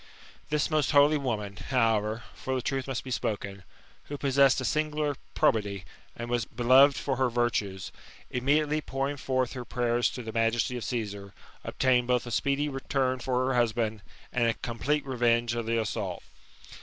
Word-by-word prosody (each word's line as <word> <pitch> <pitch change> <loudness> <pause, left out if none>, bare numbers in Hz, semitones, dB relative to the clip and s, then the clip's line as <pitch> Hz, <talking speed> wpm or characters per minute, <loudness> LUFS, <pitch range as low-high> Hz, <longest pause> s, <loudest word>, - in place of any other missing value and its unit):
This 150 +1 0
most 155 -3 +2
holy 145 +1 +5
woman, 105 -7 -3
however, 115 -3 0
(for 130 - -4
the 130 - -2
truth 135 0 -2
must 130 -2 -3
be 130 - -7
spoken), 100 -4 -3 0.4
who 145 - -6
possessed 135 -1 +4
a 130 - -3
singular 150 -1 0 0.2
{Probity, 100 -4 +1 0.3
and 120 - -6
was 120 -1 0
beloved 130 +5 +5
for 135 -2 -2
her 130 -1 +2
virtues, 105 -6 -1 0.4
immediately 150 +4 +1
pouring 135 0 -2
forth 130 -2 -1
her 125 -2 -5
prayers 120 0 0
to 125 - -6
the 110 -1 -6
majesty 115 +2 +1
of 120 - -4
Csesar, 100 -5 -4 0.3
obtained 125 -2 +1
both 125 -1 +1
a 120 - -6
speedy 140 +4 +1
return 135 -2 -1
for 130 0 0
her 130 - 0
husband, 115 -3 0 0.3
and 120 -1 +2
a 115 - +1
l^omplete 140 +5 -2
revenge 120 -2 +1
of 120 -1 -3
the 115 0 +1
assault. 105 -4 -3
125 Hz, 170 wpm, -28 LUFS, 115-135 Hz, 0.4 s, holy